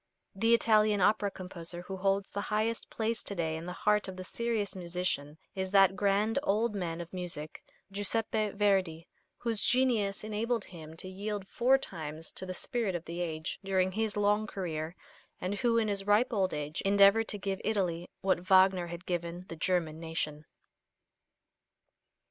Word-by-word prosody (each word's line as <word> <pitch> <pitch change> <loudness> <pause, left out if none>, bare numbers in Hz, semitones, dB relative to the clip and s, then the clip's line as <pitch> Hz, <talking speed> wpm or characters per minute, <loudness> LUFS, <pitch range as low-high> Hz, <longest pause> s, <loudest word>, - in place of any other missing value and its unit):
The 225 +4 +4
Italian 215 -2 +3
opera 205 +2 +3
composer 175 -2 -5
who 190 +1 -6
holds 195 +1 0
the 200 - -3
highest 220 +2 -1
place 225 0 -2
to 200 - -5
day 160 -2 -1
in 165 +2 -6
the - - -3
heart 210 -1 +3
of 190 - -6
the 185 - -5
serious 215 -1 -2
musician 170 -5 -2 0.2
is 190 -1 -3
that 195 -1 +5
grand 205 +4 +2
old 220 -1 +1
man 175 -4 -3
of 170 +1 -10
music, 175 -4 -3 0.3
Giuseppe 215 +2 0
Verdi, 190 -5 +1 0.3
whose 230 -3 +3
genius 235 -7 +2
enabled 220 +1 -1
him 160 -2 -11
to 185 - -4
yield 200 +1 -4
four 255 +5 +3
times 160 - -6
to 190 - -5
the 185 - -3
spirit 230 -3 -1
of 175 - -4
the 170 +1 -5
age, 160 -2 -3
during 190 -1 +1
his 215 +1 -1
long 205 +1 +2
career, 165 -4 -4 0.4
and 185 +2 -2
who 235 -2 +2
in 225 -1 +2
his 200 -1 -2
ripe 220 +5 +3
old 190 -3 +1
age 150 0 -3
endeavored 200 +3 +5
to 205 - -2
give 195 -1 -3
Italy 180 -5 -1
what 190 -2 +2
Wagner 185 -1 +4
had 170 +1 -8
given 175 0 -3
the 165 - -6
German 165 -2 0
nation. 160 -2 -3
195 Hz, 170 wpm, -31 LUFS, 175-210 Hz, 0.4 s, that